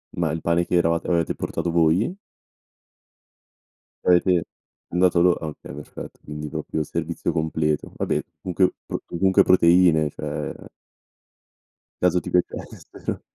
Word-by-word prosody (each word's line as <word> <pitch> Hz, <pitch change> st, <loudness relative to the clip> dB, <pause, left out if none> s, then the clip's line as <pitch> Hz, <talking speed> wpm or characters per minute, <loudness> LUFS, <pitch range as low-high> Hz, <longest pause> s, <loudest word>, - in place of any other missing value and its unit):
Ma 85 Hz, -3 st, 0 dB
il 80 Hz, 0 st, -3 dB
pane 85 Hz, +1 st, +1 dB
che -, -, -1 dB
eravat 85 Hz, -1 st, +2 dB
avevate 85 Hz, -2 st, +1 dB
portato 85 Hz, -, -3 dB
voi? 85 Hz, -, +2 dB, 1.9 s
Avete 90 Hz, -1 st, +4 dB, 0.5 s
andato 90 Hz, 0 st, +3 dB
lor 90 Hz, 0 st, +4 dB
ah 80 Hz, -, -4 dB
okay, 75 Hz, -, -9 dB
perfetto 75 Hz, 0 st, -9 dB
quindi 75 Hz, 0 st, -6 dB
proprio 80 Hz, -, -3 dB
servizio 85 Hz, +2 st, -3 dB
completo. 80 Hz, -2 st, -1 dB
Vabbè -, -, 0 dB, 0.2 s
comunque 90 Hz, 0 st, +1 dB
pro -, -, -4 dB
comunque 95 Hz, +2 st, +3 dB
proteine 85 Hz, -3 st, +5 dB
cioè -, -, -5 dB, 1.5 s
Caso 90 Hz, 0 st, +3 dB
ti -, -, -7 dB
piacessero. 90 Hz, -, -3 dB
85 Hz, 120 wpm, -23 LUFS, 80-90 Hz, 1.9 s, proteine